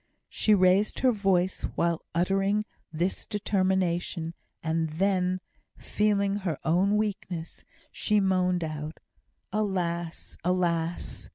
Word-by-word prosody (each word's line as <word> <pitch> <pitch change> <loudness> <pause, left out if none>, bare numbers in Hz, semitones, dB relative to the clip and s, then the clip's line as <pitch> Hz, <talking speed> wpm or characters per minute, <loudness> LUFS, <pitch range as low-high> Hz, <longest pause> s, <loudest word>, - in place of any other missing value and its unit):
She 215 - +3
raised 190 +2 +3
her 255 0 +5
voice 190 -4 +1
while 170 -1 +1
uttering 195 +4 +2 0.3
this 170 +4 -2
determination, 185 -4 0 0.3
and 160 0 0
then, 185 +2 +1 0.4
feeling 200 -1 +1
her 180 -7 -2
own 185 +6 +3
weakness, 185 -6 -3 0.3
she 210 -1 +1
moaned 185 -2 +2
out, 155 0 -5 0.5
"Alas! 175 -5 -2
alas!" 170 -2 -1
185 Hz, 100 wpm, -28 LUFS, 170-200 Hz, 0.5 s, her